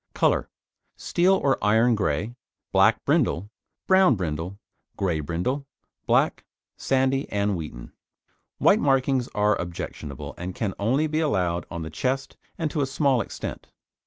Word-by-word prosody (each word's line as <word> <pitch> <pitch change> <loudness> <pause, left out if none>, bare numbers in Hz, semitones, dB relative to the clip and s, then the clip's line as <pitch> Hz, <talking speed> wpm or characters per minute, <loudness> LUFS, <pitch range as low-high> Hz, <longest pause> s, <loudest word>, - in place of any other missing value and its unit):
COLOUR - - +2 0.5
Steel 180 +2 +2
or 140 -7 +1
iron 110 +3 +4
grey, 105 +1 -1 0.4
black - - +4
brindle, 100 +6 +1 0.3
brown 190 -7 +5
brindle, 85 +1 -4 0.4
grey 90 -5 0
brindle, 90 - -2 0.4
black, - - +2 0.3
sandy 135 +1 0
and 100 -1 0
wheaten. 75 -8 -7 0.7
White - - +4
markings 135 -2 +2
are 105 0 +3
objectionable, 80 -5 -6
and 90 +1 -5
can 105 -5 -2
only 130 +9 +2
be 155 0 -1
allowed 90 - 0
on 85 -1 -5
the 80 - -7
chest 130 +9 -2 0.2
and 160 -3 -2
to 150 - -1
a 135 - +1
small 135 -2 +2
extent. - - -6
110 Hz, 135 wpm, -25 LUFS, 90-135 Hz, 0.7 s, brown